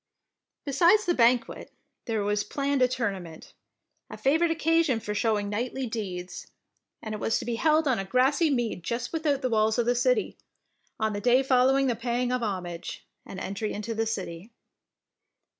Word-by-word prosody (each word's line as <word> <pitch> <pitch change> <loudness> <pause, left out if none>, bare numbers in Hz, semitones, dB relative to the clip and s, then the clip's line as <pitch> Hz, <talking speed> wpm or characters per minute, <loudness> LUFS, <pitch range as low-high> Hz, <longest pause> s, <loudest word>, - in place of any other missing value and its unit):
Besides 350 +9 +4
the 350 - +2
banquet, 240 -3 +1 0.3
there 220 -3 -1
was 205 0 0
planned 280 -1 -1
a 255 - +6
tournament, 195 -10 -5 0.6
a - - -8
favourite 320 +5 +2
oc 325 - -1
casion 325 -6 +2
for 210 -1 -4
showing 210 -1 0
knightly 245 +5 -3
deeds, 185 -6 -5 0.6
and 220 - -5
it 210 - -4
was 225 - 0
to - - -5
be 240 - -2
held 310 +5 +2
on 255 -5 +2
a - - -2
grassy 265 - +2
mead 240 -9 -1
just 235 - -3
without 300 -4 0
the 255 - +1
walls 220 0 +2
of 240 - +1
the 245 - +3
city, 435 - 0 0.6
on 220 -1 0
the 205 - -4
day 250 +4 +4
following 265 +1 +3
the 245 -3 +1
paying 245 +2 -1
of 250 -1 0
homage, 180 -6 -5 0.2
and 190 - -7
entry 200 +3 -3
into 210 +3 -4
the 225 0 -1
city. 190 -2 -5
240 Hz, 175 wpm, -27 LUFS, 210-270 Hz, 0.6 s, a